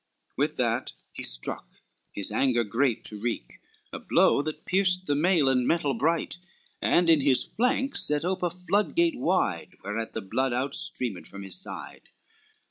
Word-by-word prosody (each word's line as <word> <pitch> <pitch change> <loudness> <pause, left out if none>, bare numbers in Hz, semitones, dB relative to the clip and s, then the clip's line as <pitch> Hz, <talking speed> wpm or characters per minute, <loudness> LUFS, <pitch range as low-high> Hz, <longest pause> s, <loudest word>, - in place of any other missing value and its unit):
With - - 0
that - - -1 0.2
he - - -7
struck, - - -3 0.3
his 100 +1 -2
anger 120 +1 +2
great 115 +3 0
to 105 - -5
wreak, 110 - -4 0.3
A - - -4
blow, - - +3
that 155 +1 -6
pierced 185 -1 +1
the 145 - +1
mail 155 0 +3
and 125 -2 +2
metal 150 -5 +1
bright, 160 +7 0 0.4
And 175 0 +3
in 160 -3 +5
his 135 -2 +3
flank 260 +4 0
set 150 +2 +1
ope 185 +1 -1
a 175 - +1
floodgate 205 - 0
wide, 160 - 0
Whereat 110 +3 -4
the 110 - -3
blood 130 +6 -1
out 130 +3 -1
streamed 125 - -2
from 100 0 -9
his 95 -1 -3
side. - - -7
140 Hz, 165 wpm, -27 LUFS, 115-180 Hz, 0.4 s, in